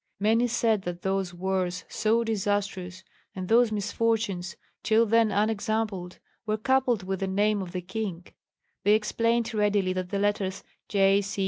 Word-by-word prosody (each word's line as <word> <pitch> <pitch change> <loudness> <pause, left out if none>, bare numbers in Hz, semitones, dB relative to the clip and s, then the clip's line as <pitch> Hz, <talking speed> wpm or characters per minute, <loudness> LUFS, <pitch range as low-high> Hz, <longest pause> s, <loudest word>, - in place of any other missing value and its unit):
Many 225 +4 +3
said 225 -3 +1
that 175 -1 -6
those 190 -1 -1
wars 185 0 -2
so 225 +2 +1
disastrous, 200 -4 -2 0.3
and 185 -1 -5
those 230 +1 +4
misfortunes 205 -3 -1 0.3
till 225 +1 +3
then 230 0 +3
unexampled, 210 -3 -1 0.3
were 215 0 +1
coupled 250 -2 +1
with 190 0 -3
the 195 - -1
name 205 +2 +1
of 180 -2 -6
the 180 0 -4
king; 185 -2 -4 0.6
they 205 +1 +5
explained 230 +2 0
readily 205 -3 +1
that 185 -1 -3
the 200 - -2
letters 200 -1 -1 0.3
"J. 195 0 +4
205 Hz, 145 wpm, -27 LUFS, 190-220 Hz, 0.6 s, they